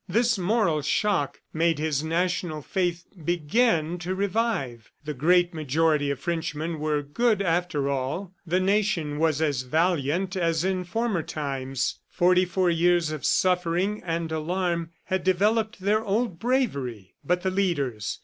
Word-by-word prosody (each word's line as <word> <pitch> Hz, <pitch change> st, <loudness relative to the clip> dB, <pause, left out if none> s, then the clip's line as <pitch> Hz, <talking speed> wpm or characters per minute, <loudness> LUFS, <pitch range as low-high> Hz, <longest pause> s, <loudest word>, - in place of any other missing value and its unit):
This 230 Hz, +4 st, +3 dB
moral 190 Hz, -5 st, +1 dB
shock 175 Hz, 0 st, 0 dB
made 165 Hz, 0 st, +2 dB
his 150 Hz, -1 st, -1 dB
national 170 Hz, -1 st, -1 dB
faith 175 Hz, -1 st, -1 dB, 0.2 s
begin 175 Hz, +1 st, +1 dB
to 180 Hz, +2 st, -3 dB
revive. 190 Hz, -, -1 dB, 0.2 s
The 150 Hz, -, -3 dB
great 175 Hz, +6 st, +3 dB
majority 155 Hz, -1 st, +1 dB
of 140 Hz, -2 st, -2 dB
Frenchmen 160 Hz, 0 st, -3 dB
were 150 Hz, -1 st, 0 dB
good 215 Hz, +9 st, +1 dB
after 170 Hz, -6 st, 0 dB
all; 140 Hz, +8 st, -2 dB
the 180 Hz, +1 st, +1 dB
nation 185 Hz, -6 st, +1 dB
was 160 Hz, -1 st, +2 dB
as 145 Hz, -5 st, 0 dB
valiant 165 Hz, +5 st, 0 dB
as 165 Hz, -3 st, +1 dB
in 185 Hz, -1 st, -1 dB
former 220 Hz, -1 st, -1 dB
times. 135 Hz, -4 st, -3 dB
Forty 180 Hz, +1 st, +3 dB
four 180 Hz, 0 st, +1 dB
years 170 Hz, -1 st, +2 dB
of 155 Hz, -3 st, -5 dB
suffering 180 Hz, +3 st, +1 dB
and 165 Hz, -1 st, -2 dB
alarm 170 Hz, +1 st, -1 dB
had 190 Hz, -1 st, -2 dB
developed 215 Hz, +5 st, +1 dB
their 210 Hz, +3 st, +1 dB
old 205 Hz, -3 st, -1 dB
bravery. 140 Hz, -, -1 dB
But 180 Hz, +4 st, 0 dB
the 190 Hz, -, +1 dB
leaders? 145 Hz, -, -1 dB
170 Hz, 140 wpm, -26 LUFS, 150-190 Hz, 0.2 s, This